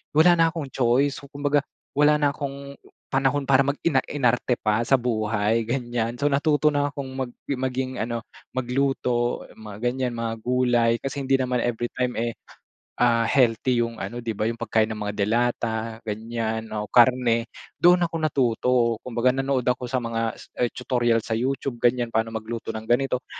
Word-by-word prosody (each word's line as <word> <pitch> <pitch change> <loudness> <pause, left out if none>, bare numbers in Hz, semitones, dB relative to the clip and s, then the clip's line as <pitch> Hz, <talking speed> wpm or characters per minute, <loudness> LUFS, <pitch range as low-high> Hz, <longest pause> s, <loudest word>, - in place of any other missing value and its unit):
Wala 175 +3 +7
na 165 - +6
akong 155 -5 -6
choice, 130 +3 +2
kumbaga 145 0 +1 0.3
wala 150 +1 +4
na 145 -1 +2
akong 140 -1 -6 0.4
panahon 135 +2 +1
para 135 0 +5
mag 140 +1 -1
ina-inarte 130 -5 +1
pa 110 +2 +1
sa - - +1
buhay 110 -2 0
ganiyan. 120 -1 -2
So 145 +3 +1
natuto 150 +1 +3
na 145 0 +1
akong 140 -2 -5
mag 130 -2 -4 0.2
maging 130 -1 -2
ano, 115 0 -2 0.3
magluto, 125 -1 0
mga 105 -2 -9
ganyan, 125 0 0
mga 115 -1 -2
gulay 120 -1 +2
kasi 135 +1 -4
hindi 135 - +1
naman 125 -1 0
everytime 120 +1 -2
eh 115 0 -1 0.6
ah 115 -1 +3
healthy 120 -1 +2
yung 115 -1 -4
ano 120 +5 -5
'di 115 -3 -4
ba, 110 - +1
yung 115 - -1
pagkain 110 -1 +2
ng 110 -1 -6
mga 105 0 -3
delata 115 +1 0
ganiyan 110 +1 -3
o 105 - -3
karne. 120 -1 +3 0.2
Doon 175 0 +5
ako 165 - -12
natuto. 125 -4 +1 0.3
Kumbaga, 125 +1 +1
nanood 135 -2 0
ako 125 -1 0
sa 130 - +1
mga 115 -1 -2 0.3
tutorial 120 -2 +1
sa 110 0 -3
YouTube 130 0 -2
ganiyan, 120 -1 +1
paano 110 0 +1
magluto 115 +1 -5
ng 110 0 -6
ganito. 125 +1 +1
120 Hz, 160 wpm, -24 LUFS, 115-135 Hz, 0.6 s, Wala